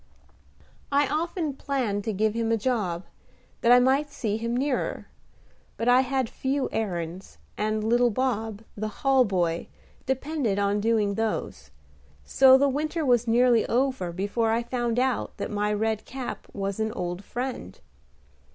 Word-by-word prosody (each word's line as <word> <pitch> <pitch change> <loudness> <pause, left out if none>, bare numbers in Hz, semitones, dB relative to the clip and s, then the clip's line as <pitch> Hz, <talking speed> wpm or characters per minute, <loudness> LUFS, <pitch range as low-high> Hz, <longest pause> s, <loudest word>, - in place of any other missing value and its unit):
I 285 0 +3
often 320 0 -2
planned 255 -8 -2
to 220 - 0
give 215 +1 +1
him 230 0 -1
a 225 - +3
job, 200 -7 -1 0.6
that 235 - +4
I 245 - +9
might 270 +4 +2
see 220 -7 -2
him 230 +2 -2
nearer; 270 0 -1 0.7
but 230 - -2
I 250 +1 +6
had 265 -1 -1
few 270 +4 -2
errands, 180 -3 -4 0.2
and 215 0 -1
little 240 +2 +3
Bob, 225 -3 -2
the 215 +1 -3
hall 265 +4 +2
boy, 175 -4 -1 0.4
depended 265 -5 -1
on 200 0 +1
doing 215 -2 +2
those: 200 - -3 0.6
so 265 -1 +6
the 280 +1 +3
winter 305 +4 -1
was 245 -2 +3
nearly 240 0 +4
over 255 -8 0
before 205 +6 -1
I 230 +1 +1
found 240 -1 -2
out 255 0 0
that - - -4
my 210 0 0
Red 220 +1 -1
Cap 260 -1 -6
was 195 0 -3
an 220 0 0
old 180 +1 -4
friend. 245 - -5
230 Hz, 150 wpm, -26 LUFS, 205-260 Hz, 0.7 s, I